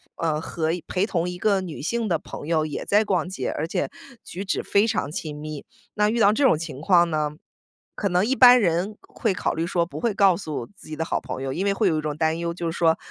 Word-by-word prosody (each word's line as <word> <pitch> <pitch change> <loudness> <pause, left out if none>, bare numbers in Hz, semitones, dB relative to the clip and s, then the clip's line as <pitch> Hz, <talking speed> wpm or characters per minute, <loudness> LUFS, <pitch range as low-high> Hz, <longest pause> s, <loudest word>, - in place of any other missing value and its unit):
呃， 155 -2 -1
和 160 0 -3 0.2
陪 185 +2 0
同 175 -4 -1
一 180 - -6
个 200 0 +2
女 170 -6 -7
性 230 +7 -1
的 170 -4 +1
朋 - - -9
友 160 -2 +1
也 150 - -5
在 210 +2 +4
逛 180 -5 0
街， 190 - -3
而 160 - -3
且 - - -2 0.3
举 195 +3 -7
止 190 - -1
非 205 +3 +3
常 200 -9 -1
亲 155 -3 -5
密。 150 -1 -7 0.3
那 210 0 +3
遇 235 +1 0
到 205 -1 +6
这 275 +6 0
种 160 - +5
情 160 -4 -6
况 175 -1 +4
呢， 150 -1 0 0.6
可 200 - -1
能 180 +1 +2
一 265 - +1
般 250 -1 +8
人 185 +3 0
会 220 -5 -1
考 - - -1
虑 165 +1 -1
说 170 -1 0
不 170 - -8
会 235 -3 +1
告 195 -3 +4
诉 150 -10 -5
自 - - -15
己 155 - -6
的 160 - -2
好 - - -1
朋 130 - -6
友， 135 0 -3
因 190 +4 -2
为 200 - +2
会 200 0 +1
有 160 - +2
一 155 - -1
种 150 -1 -3
担 160 0 +1
忧， 170 0 -2
就 170 -1 -3
是 - - -7
说， 165 -1 +3
175 Hz, 280 characters per minute, -24 LUFS, 160-200 Hz, 0.6 s, 般